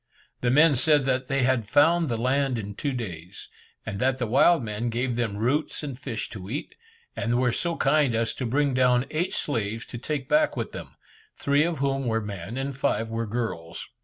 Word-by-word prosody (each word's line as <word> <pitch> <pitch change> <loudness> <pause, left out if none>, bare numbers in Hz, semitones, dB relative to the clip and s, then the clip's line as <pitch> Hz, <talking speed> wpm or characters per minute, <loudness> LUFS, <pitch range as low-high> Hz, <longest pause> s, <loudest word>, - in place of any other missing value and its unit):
The 120 - 0
men 150 +4 +6
said 145 +1 +3
that 130 -1 0
they 135 -1 +1
had 125 -5 +1
found 165 +5 +4
the 115 - -1
land 130 +2 +1
in 105 -2 -5
two 140 +7 -2
days, 95 -7 -7 0.4
and 100 -2 -4
that 130 +2 +1
the 125 - -1
wild 135 +6 +4
men 110 +2 -3
gave 120 +1 -1
them 115 -4 -2
roots 135 +9 -1
and 140 -3 -4
fish 130 -3 -5
to 95 -2 -8
eat, 145 +7 -4 0.4
and 120 +1 0
were 125 -1 +2
so 170 +7 -1
kind 140 -4 +2
as 115 0 0
to 130 - -3
bring 140 +3 +1
down 125 0 +3
eight 165 +4 -1
slaves 115 -4 -2
to 120 - -8
take 140 +1 -3
back 305 0 +2
with - - -3
them, - - -9 0.4
three 140 +1 +2
of 170 -1 -1
whom 135 -1 -1
were 115 -1 +1
men 105 +1 -6
and 135 0 -3
five 115 -4 -1
were 115 0 -2
girls. 105 -8 -4
125 Hz, 205 wpm, -26 LUFS, 115-140 Hz, 0.4 s, men